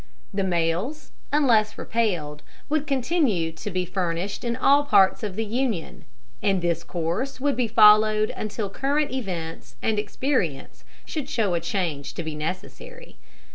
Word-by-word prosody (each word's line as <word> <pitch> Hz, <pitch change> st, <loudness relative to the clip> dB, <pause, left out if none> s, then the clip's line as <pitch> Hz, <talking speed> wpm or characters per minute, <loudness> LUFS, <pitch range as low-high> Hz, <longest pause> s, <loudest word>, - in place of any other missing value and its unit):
The 195 Hz, 0 st, 0 dB
mails, 180 Hz, -, -1 dB, 0.2 s
unless 235 Hz, -8 st, +3 dB
repelled, 175 Hz, -10 st, -1 dB, 0.3 s
would 305 Hz, 0 st, 0 dB
continue 255 Hz, -, +1 dB
to 160 Hz, +6 st, -7 dB
be 185 Hz, -1 st, -1 dB
furnished 180 Hz, +1 st, -2 dB
in 235 Hz, -1 st, -1 dB
all 280 Hz, +3 st, +4 dB
parts 195 Hz, -9 st, +4 dB
of 205 Hz, -4 st, -4 dB
the 225 Hz, +1 st, -1 dB
Union; 225 Hz, -5 st, -2 dB, 0.4 s
and 195 Hz, -2 st, +2 dB
this 170 Hz, -1 st, 0 dB
course 175 Hz, +12 st, -3 dB
would 280 Hz, +1 st, +1 dB
be 250 Hz, -2 st, +1 dB
followed 215 Hz, 0 st, +6 dB
until 215 Hz, 0 st, -4 dB
current 280 Hz, +8 st, 0 dB
events 180 Hz, -10 st, -5 dB
and 215 Hz, -2 st, 0 dB
experience 210 Hz, -, -2 dB, 0.2 s
should 290 Hz, -3 st, -4 dB
show 215 Hz, -9 st, +1 dB
a 170 Hz, -, +1 dB
change 165 Hz, -5 st, -3 dB
to 170 Hz, -, -4 dB
be 160 Hz, -1 st, -4 dB
necessary. 185 Hz, -, -7 dB
210 Hz, 145 wpm, -25 LUFS, 170-260 Hz, 0.4 s, followed